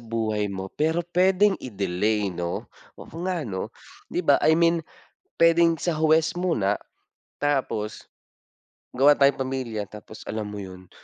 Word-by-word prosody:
buhay 110 -2 -2
mo, 95 -1 -6
pero 160 +3 0
puwedeng 185 +4 +3
i-delay, 100 -2 -1
'no. 85 0 -3 0.3
Oo - - -13
nga, 175 -4 -1
'no. 95 -5 -4 0.4
'Di 175 - -2
ba, 140 - +5
I 160 0 +4
mean, 170 0 +3 0.6
puwedeng 165 0 +5
sa 160 -1 -2
huwes 160 0 +3
muna, 110 - +1 0.6
tapos, 130 -7 -1 0.8
gawa 140 +4 +5
tayong 140 -1 +3
pamilya. 120 -6 -3
Tapos, 105 +1 -12
alam 105 -1 -4
mo 105 - -7
'yon, 95 -2 -9
130 Hz, 135 wpm, -25 LUFS, 105-165 Hz, 0.8 s, ba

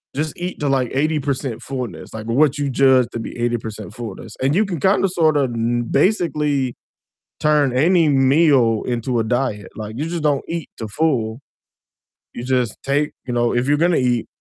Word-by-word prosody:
just 155 +1 -2
eat 180 +1 -5
to, 145 - -1
like, 130 -3 +1
80% 140 -4 -1
fullness, 125 -12 -6
like, 110 0 -6
what 140 +5 +2
you 140 -1 -1
judge 130 -2 +4
to 115 - -3
be 115 - -7
80% 110 -3 -3
fullness, 115 -4 -8
and 140 +4 +2
you 215 +2 +3
can 175 -6 -4
kinda 195 +2 +3
sorta 155 -6 +2
kno 120 0 -1
basically 150 - +1 0.7
turn 150 -4 +2
any 165 +2 +4
meal 135 -4 +4
into 120 0 -1
a 110 - +1
diet, 110 -4 -1
like, 110 +1 -6
you 155 - -2
just 170 -2 -3
don't 145 -3 +1
eat 170 -1 -4
to 110 -2 -5
full. 115 -2 0 0.9
You 120 - -6
just 125 -3 0
take 145 +2 0
you 125 - -3
know, 120 0 +1
if 120 +2 +1
you're 145 +1 +2
gonna 170 0 +3
eat, 125 -3 +1
135 Hz, 180 wpm, -20 LUFS, 120-150 Hz, 0.9 s, judge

